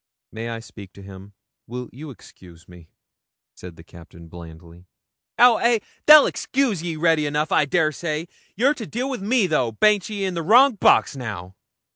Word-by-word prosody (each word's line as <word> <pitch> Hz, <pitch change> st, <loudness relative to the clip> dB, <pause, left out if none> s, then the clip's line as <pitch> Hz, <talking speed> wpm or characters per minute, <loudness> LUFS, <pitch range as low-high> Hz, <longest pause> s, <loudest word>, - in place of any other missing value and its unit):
'May 115 Hz, +1 st, -7 dB
I 115 Hz, -1 st, -6 dB
speak 100 Hz, -4 st, -14 dB
to 100 Hz, -, -15 dB
him? 95 Hz, +1 st, -13 dB, 0.3 s
Will 125 Hz, +1 st, -7 dB
you 150 Hz, +5 st, -10 dB
excuse 90 Hz, -9 st, -17 dB
me?' 90 Hz, -2 st, -17 dB, 0.6 s
said 90 Hz, -2 st, -12 dB
the 80 Hz, -, -16 dB
Captain 85 Hz, -1 st, -16 dB
blandly. 85 Hz, +1 st, -14 dB, 0.5 s
'Ow 245 Hz, -2 st, +5 dB
ay, 235 Hz, -1 st, +1 dB, 0.3 s
they'll 300 Hz, -1 st, +9 dB
excuse 255 Hz, -, -2 dB
ye 170 Hz, -1 st, -5 dB
ready 160 Hz, -1 st, +1 dB
enough, 150 Hz, +2 st, -2 dB
I -, -, +2 dB
dessay; 155 Hz, 0 st, -2 dB, 0.3 s
you're 260 Hz, +8 st, +2 dB
to 230 Hz, -8 st, -9 dB
deal 255 Hz, +4 st, -4 dB
wi' 260 Hz, -, -4 dB
me 215 Hz, +2 st, 0 dB
though. 130 Hz, -9 st, -1 dB
Baint 205 Hz, -, +1 dB
ye 205 Hz, -2 st, -4 dB
in 185 Hz, -, -3 dB
the 170 Hz, -, -4 dB
wrong 245 Hz, -, +5 dB
box 200 Hz, -, +2 dB
now?' 100 Hz, -8 st, -8 dB
150 Hz, 175 wpm, -21 LUFS, -, 0.6 s, they'll